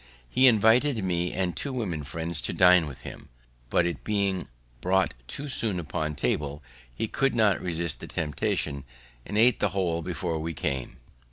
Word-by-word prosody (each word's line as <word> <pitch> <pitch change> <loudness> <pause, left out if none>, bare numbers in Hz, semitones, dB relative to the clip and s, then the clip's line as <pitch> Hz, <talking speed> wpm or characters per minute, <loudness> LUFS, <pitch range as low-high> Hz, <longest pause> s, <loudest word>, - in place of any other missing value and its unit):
He 130 - +5
invited 115 +2 +4
me 90 -1 0
and 90 -2 -1
two 140 - -3
women 95 - -3
friends 80 +3 -4
to - - -2
dine 90 -3 +6
with 65 -3 -9
him; - - -10 0.4
but, 85 - +3
it 85 -4 -3
being 100 -3 0 0.3
brought 95 +1 +2
too 145 - -5
soon 110 -8 -1
upon 75 -1 -3
table, 70 +2 -2 0.3
he 115 - -2
could 135 +3 +1
not 110 -4 +3
resist 85 -2 -2
the - - -8
temptation, 75 -3 -2 0.4
and 105 - -2
ate 120 +1 +5
the 105 - +2
whole 90 -3 -1
before 85 -1 -3
we 80 +1 -4
came. 65 -2 -3
90 Hz, 170 wpm, -27 LUFS, 80-105 Hz, 0.4 s, dine